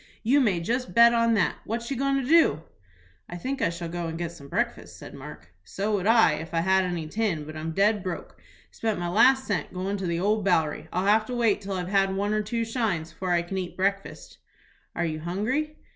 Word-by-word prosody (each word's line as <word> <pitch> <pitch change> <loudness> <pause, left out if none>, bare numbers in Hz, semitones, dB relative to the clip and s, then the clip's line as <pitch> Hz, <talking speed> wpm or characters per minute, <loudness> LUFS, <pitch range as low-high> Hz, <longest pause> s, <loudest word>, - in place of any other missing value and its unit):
"You 260 +6 +4
may 200 -9 +2
just 245 +10 -2
bet 235 0 +7
on 230 -1 +3
that. 205 - +1
What 235 +3 -4
you - - 0
goin' 275 +1 +1
to 255 - -4
do?" 295 - +4 0.7
"I 175 - -6
think 265 +10 -4
I - - +2
shall 170 0 -5
go 170 0 -4
and 165 0 -5
get 170 -1 -3
some 140 -5 -13
breakfast," - - -3
said - - -11
Mark. 85 +3 -11
"So 195 - -3
would 200 -1 0
I, 225 0 +6
if 165 +2 -7
I 165 - +2
had 190 +1 +3
any 175 -3 -3
tin; 195 -4 -1
but 155 +1 -9
I'm 155 +1 -4
dead 205 +4 +2
broke, 180 -2 -7 0.3
spent 220 -2 -2
my 175 0 -3
last 260 +8 +4
cent 200 -4 -2
goin' 190 +2 -3
to 190 -2 -3
the 170 0 -1
Old 210 +3 +1
Bowery. 160 -5 +1
I'll 185 +2 -1
have 215 +2 +3
to 250 - -4
wait 225 -4 +2
till 200 0 -5
I've 180 -1 -3
had 195 0 +2
one 205 +2 0
or 215 - +1
two 230 +2 -2
shines 220 -9 -2
before 185 - -5
I 170 0 +2
can 190 +2 -4
eat 180 -1 -6
breakfast." 195 +1 -3 0.6
"Are 170 - 0
you 155 -1 -3
hungry?" 230 - -2
195 Hz, 235 wpm, -26 LUFS, 170-225 Hz, 0.7 s, bet